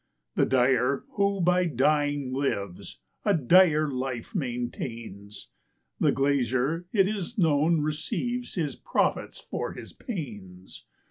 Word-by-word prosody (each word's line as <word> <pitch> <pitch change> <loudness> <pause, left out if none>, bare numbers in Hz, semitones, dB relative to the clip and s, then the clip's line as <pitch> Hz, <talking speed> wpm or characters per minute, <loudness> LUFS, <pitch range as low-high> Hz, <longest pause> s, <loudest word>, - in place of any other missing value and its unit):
The - - +2
dyer, 130 +1 +2
who 200 -1 +1
by 180 +1 +3
dying 145 -2 +1
lives, 100 -9 -3 0.3
a 205 - +3
dire 155 +1 +5
life 130 - -4
maintains; 120 - -5 0.5
The - - +4
glazier, 135 +4 0
it 195 -4 +4
is 210 +2 -4
known, 160 -2 +3
receives 240 +12 -2
his 160 -6 -1
profits - - -1
for - - -4
his - - -10
panes. 105 - -8
145 Hz, 115 wpm, -27 LUFS, 125-175 Hz, 0.5 s, dire